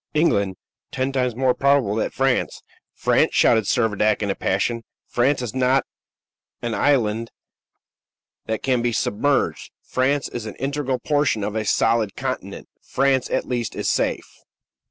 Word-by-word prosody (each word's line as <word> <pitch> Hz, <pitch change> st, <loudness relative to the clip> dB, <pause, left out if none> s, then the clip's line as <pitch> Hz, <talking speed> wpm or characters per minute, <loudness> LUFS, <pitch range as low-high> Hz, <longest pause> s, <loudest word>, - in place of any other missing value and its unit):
"England! 100 Hz, -, +2 dB, 0.4 s
Ten 130 Hz, +1 st, -1 dB
times 125 Hz, -3 st, 0 dB
more 130 Hz, 0 st, +2 dB
probable 140 Hz, -7 st, +2 dB
that 110 Hz, -, -1 dB
France 135 Hz, -1 st, 0 dB, 0.2 s
" -, -, -63 dB
"France!" -, -, +3 dB
shouted 110 Hz, -2 st, +4 dB
Servadac 110 Hz, -1 st, +1 dB
in 100 Hz, -, 0 dB
a -, -, -3 dB
passion. 115 Hz, +5 st, -1 dB, 0.2 s
"France 130 Hz, +2 st, +1 dB
is 115 Hz, -, -4 dB
not 130 Hz, +1 st, +2 dB, 0.8 s
an 120 Hz, -1 st, -2 dB
island 115 Hz, -4 st, +1 dB, 1.2 s
that 110 Hz, -1 st, -2 dB
can 130 Hz, -3 st, +1 dB
be 120 Hz, 0 st, 0 dB
submerged; 135 Hz, +7 st, 0 dB
France 135 Hz, +2 st, 0 dB
is 115 Hz, -2 st, -6 dB
an -, -, -7 dB
integral 135 Hz, -1 st, -2 dB
portion 145 Hz, -5 st, 0 dB
of 105 Hz, +1 st, -3 dB
a 110 Hz, -, 0 dB
solid 115 Hz, -1 st, +1 dB
continent. -, -, -5 dB
France, 135 Hz, -1 st, +1 dB
at -, -, -1 dB
least, 120 Hz, -4 st, -3 dB
is -, -, -3 dB
safe." -, -, -2 dB
125 Hz, 150 wpm, -22 LUFS, 110-135 Hz, 1.2 s, shouted